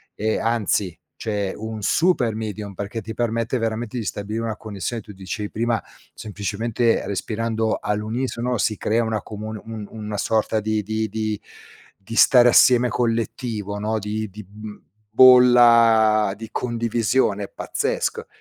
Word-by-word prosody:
e 110 Hz, +1 st, -1 dB
anzi, 105 Hz, -6 st, 0 dB, 0.2 s
c'è 100 Hz, -3 st, -2 dB
un 110 Hz, 0 st, -6 dB
super 125 Hz, -, +2 dB
medium 105 Hz, -2 st, -5 dB
perché 105 Hz, +4 st, -5 dB
ti 110 Hz, +2 st, -7 dB
permette 115 Hz, +1 st, -1 dB
veramente 115 Hz, +1 st, -3 dB
di 110 Hz, -, -3 dB
stabilire 105 Hz, +4 st, -4 dB
una 110 Hz, -2 st, -3 dB
connessione 110 Hz, +2 st, -5 dB
tu 105 Hz, 0 st, -12 dB
dicevi 100 Hz, +2 st, -5 dB
prima, 115 Hz, 0 st, -1 dB, 0.3 s
semplicemente 110 Hz, +3 st, -1 dB
respirando 110 Hz, +2 st, -2 dB
all'unisono 115 Hz, +4 st, -2 dB
si 110 Hz, -1 st, 0 dB
crea 115 Hz, +2 st, +1 dB
una 110 Hz, -2 st, -2 dB
comun 110 Hz, 0 st, -7 dB
un 110 Hz, -2 st, -7 dB
un 110 Hz, -1 st, -9 dB
una 105 Hz, -1 st, -4 dB
sorta 110 Hz, +1 st, 0 dB
di 110 Hz, 0 st, -1 dB
di 110 Hz, +1 st, -2 dB
di 110 Hz, -1 st, -3 dB, 0.6 s
di 110 Hz, +3 st, -9 dB
stare 120 Hz, 0 st, +6 dB
assieme 125 Hz, +1 st, +5 dB
collettivo 115 Hz, -3 st, -2 dB
no, 110 Hz, +1 st, -1 dB
di 105 Hz, +1 st, -4 dB
di, 105 Hz, +1 st, -11 dB
mhmm, 105 Hz, +1 st, -10 dB, 0.3 s
bolla 115 Hz, -4 st, +6 dB
di 115 Hz, 0 st, -8 dB
condivisione 115 Hz, -3 st, 0 dB
pazzesca. -, -, -3 dB
110 Hz, 140 wpm, -22 LUFS, 105-115 Hz, 0.6 s, stare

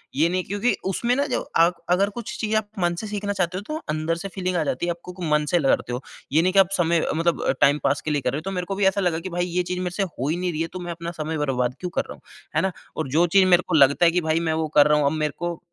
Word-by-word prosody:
ये 155 Hz, +4 st, +3 dB
नहीं 185 Hz, +1 st, -1 dB
क्योंकि 205 Hz, +5 st, 0 dB
उसमें 235 Hz, +6 st, 0 dB
ना 280 Hz, +2 st, +1 dB
जो 255 Hz, -, 0 dB, 0.2 s
आप 170 Hz, +2 st, +4 dB
अगर 190 Hz, +3 st, +3 dB
कुछ 235 Hz, -, -5 dB
चीज़ 220 Hz, 0 st, -1 dB
आप 215 Hz, -1 st, +1 dB
मन 175 Hz, -1 st, +1 dB
से 215 Hz, -, -5 dB
सीखना 205 Hz, 0 st, -3 dB
चाहते 180 Hz, -2 st, -1 dB
हो -, -, -4 dB
तो 305 Hz, -, -3 dB
अंदर 155 Hz, +2 st, 0 dB
से 170 Hz, +4 st, -5 dB
फ़ीलिंग 185 Hz, -1 st, -2 dB
आ 165 Hz, -, +1 dB
जाती 140 Hz, +2 st, -2 dB
है -, -, -2 dB
आपको 175 Hz, +1 st, -8 dB, 0.2 s
मन 150 Hz, 0 st, +2 dB
से -, -, +6 dB
लहरते 135 Hz, -4 st, +1 dB
हो। 125 Hz, -, -3 dB, 0.3 s
ये 155 Hz, +3 st, +4 dB
नहीं 185 Hz, +2 st, +1 dB
कि 195 Hz, -, +5 dB
आप 190 Hz, -2 st, +5 dB
समय 170 Hz, -2 st, +2 dB
मतलब 165 Hz, +1 st, +1 dB
अ, -, -, +2 dB
टाइम 145 Hz, +2 st, +5 dB
पास 140 Hz, +1 st, +1 dB
के 155 Hz, -, -3 dB
लिए 145 Hz, -1 st, 0 dB
कर 125 Hz, -, 0 dB
रहे 135 Hz, -, -2 dB
हो। -, -, -4 dB
तो -, -, -4 dB
मेरे 180 Hz, -2 st, -3 dB
को 195 Hz, -, -3 dB
भी 200 Hz, 0 st, +1 dB
ऐसा 195 Hz, +1 st, +1 dB
लगा 175 Hz, -3 st, 0 dB
कि 185 Hz, +3 st, -6 dB
भई 175 Hz, 0 st, -1 dB
ये 180 Hz, 0 st, -1 dB
चीज़ 180 Hz, +1 st, -3 dB
मेरे 180 Hz, -1 st, -2 dB
से 200 Hz, -, +1 dB
हो 150 Hz, -8 st, -4 dB
ही 165 Hz, -, 0 dB
नहीं 180 Hz, 0 st, -1 dB
रही 160 Hz, -1 st, -3 dB
है 165 Hz, -, -1 dB
तो 185 Hz, -, -5 dB
मैं 175 Hz, -1 st, -5 dB
अपना 170 Hz, 0 st, -5 dB
समय 160 Hz, +1 st, -2 dB
बर्बाद 125 Hz, -4 st, -1 dB
क्यों 180 Hz, -, -4 dB
कर -, -, +3 dB
रहा -, -, -5 dB
हूँ, -, -, -18 dB, 0.3 s
है -, -, +3 dB
ना? 190 Hz, -, 0 dB, 0.3 s
और 160 Hz, -, -2 dB
जो 170 Hz, -, +5 dB
चीज़ 190 Hz, +3 st, +5 dB
मेरे 180 Hz, -, 0 dB
को 180 Hz, -, 0 dB
लगता 140 Hz, +3 st, +5 dB
है 170 Hz, -, +5 dB
कि 180 Hz, +1 st, +1 dB
भाई 160 Hz, +1 st, +3 dB
मैं 165 Hz, -1 st, 0 dB
वो 160 Hz, 0 st, -1 dB
कर 145 Hz, -, +8 dB
रहा 150 Hz, 0 st, +4 dB
हूँ 145 Hz, -, +1 dB
अब 140 Hz, -, +3 dB
मेरे 150 Hz, -1 st, -1 dB
को 175 Hz, -1 st, -3 dB
175 Hz, 330 wpm, -23 LUFS, 155-185 Hz, 0.3 s, कर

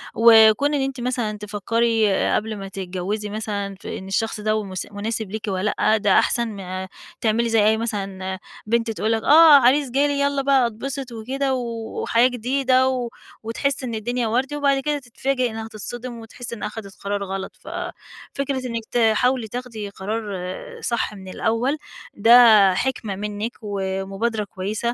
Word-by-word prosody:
وكون 225 Hz, +5 st, +6 dB
إن 280 Hz, -, +1 dB
أنتِ 270 Hz, -2 st, -3 dB
مثلًا 240 Hz, -4 st, -2 dB
تفكّري 215 Hz, +1 st, +1 dB, 0.2 s
قبل 215 Hz, 0 st, -2 dB
ما 195 Hz, 0 st, -6 dB
تتجوزي 195 Hz, +2 st, -4 dB
مثلًا 205 Hz, -2 st, -4 dB
في -, -, -5 dB
إن 190 Hz, -, -9 dB
الشخص 220 Hz, +3 st, -1 dB
ده 215 Hz, +1 st, 0 dB
ومس 195 Hz, -4 st, -4 dB
مناسب 215 Hz, 0 st, -3 dB
ليكِ 220 Hz, 0 st, -5 dB
والّا 195 Hz, +1 st, -1 dB
لأ. 220 Hz, -, +4 dB
ده 205 Hz, -2 st, +4 dB
أحسن 235 Hz, -1 st, +1 dB
ما 190 Hz, -3 st, -6 dB, 0.3 s
تعملي 230 Hz, +1 st, +1 dB
زي 220 Hz, -2 st, +3 dB
أي 220 Hz, +1 st, +4 dB
مثلًا 195 Hz, -4 st, -3 dB, 0.3 s
بنت 230 Hz, +1 st, +1 dB
تقول 220 Hz, 0 st, -1 dB
لك: 225 Hz, -1 st, 0 dB
"آه 315 Hz, +1 st, +8 dB
عريس 265 Hz, +1 st, +3 dB
جالي، 280 Hz, +2 st, +1 dB
يالّا 280 Hz, 0 st, +1 dB
بقى 270 Hz, -3 st, +3 dB
أتبسط 260 Hz, +3 st, -5 dB
وكده، 265 Hz, +4 st, -2 dB
و 255 Hz, -, 0 dB, 0.4 s
وحياة 235 Hz, +2 st, +4 dB
جديدة." 255 Hz, +1 st, +1 dB
و 250 Hz, -2 st, -2 dB, 0.3 s
وتحس 265 Hz, +5 st, -1 dB
إن 235 Hz, -3 st, -3 dB
الدنيا 240 Hz, +2 st, -1 dB
وردي، 260 Hz, +6 st, 0 dB
وبعد 280 Hz, -2 st, +2 dB
كده 295 Hz, +1 st, -1 dB
تتفاجئ 255 Hz, 0 st, -1 dB
إنها 220 Hz, 0 st, -6 dB
تتصدِم 235 Hz, +3 st, -7 dB
وتحِس 235 Hz, +1 st, -7 dB
إنها 210 Hz, -2 st, -4 dB
خدت 210 Hz, -3 st, -9 dB
قرار 200 Hz, 0 st, -2 dB
غلط، 195 Hz, 0 st, -5 dB
ففكرة 275 Hz, -2 st, -5 dB
إنِك 230 Hz, -2 st, -4 dB
تحاولي 235 Hz, +1 st, +2 dB
تاخدي 230 Hz, -3 st, -6 dB
قرار 205 Hz, +3 st, -4 dB, 0.6 s
صح 235 Hz, -, -1 dB
من 190 Hz, -2 st, -11 dB
الأول، 230 Hz, +9 st, 0 dB, 0.4 s
ده 220 Hz, -3 st, +7 dB
حِكمة 230 Hz, -2 st, -2 dB
منِّك 210 Hz, +3 st, -4 dB
ومبادرة 195 Hz, +2 st, -2 dB
كويسة. 200 Hz, +2 st, -5 dB
225 Hz, 160 wpm, -22 LUFS, 205-250 Hz, 0.6 s, آه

